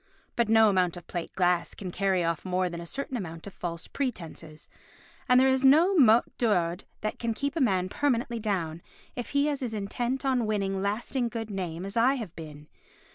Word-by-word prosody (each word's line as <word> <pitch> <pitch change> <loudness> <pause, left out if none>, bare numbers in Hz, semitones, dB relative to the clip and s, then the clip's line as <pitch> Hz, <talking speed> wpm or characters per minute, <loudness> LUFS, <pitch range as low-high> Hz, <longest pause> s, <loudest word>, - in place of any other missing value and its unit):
But 235 -2 +1
no 225 0 +6
amount 185 -3 +2
of 175 - -10
plate 175 -2 -5
glass 180 -2 +1
can 185 -3 -6
carry 190 -1 +1
off 165 -1 -1
more 185 -1 0
than 170 0 -6
a 170 - -8
certain 270 +5 -4
amount 165 -7 -6
of 200 - -9
false 170 -1 -5
pretences, 165 - -5 0.6
and 250 0 +7
there 265 - +5
is 265 0 +2
no 315 +8 +6
mot 240 -7 +6
d'ordre 180 -6 +1
that 215 - -3
can 230 -1 -1
keep 280 +3 -2
a 325 - 0
man 190 -7 +2
permanently 240 0 0
down 175 -7 -2 0.3
if 245 - -5
he 285 +1 +2
is 285 -2 -1
as 235 -4 -3
intent 240 +6 -2
on 255 -4 +1
winning 195 -2 -1
lasting 235 +5 -1
good 225 -2 -5
name 180 -2 -4
as 195 +3 -6
I 245 +4 +4
have 220 -10 -6
been. 150 -2 -10
210 Hz, 200 wpm, -28 LUFS, 180-245 Hz, 0.6 s, and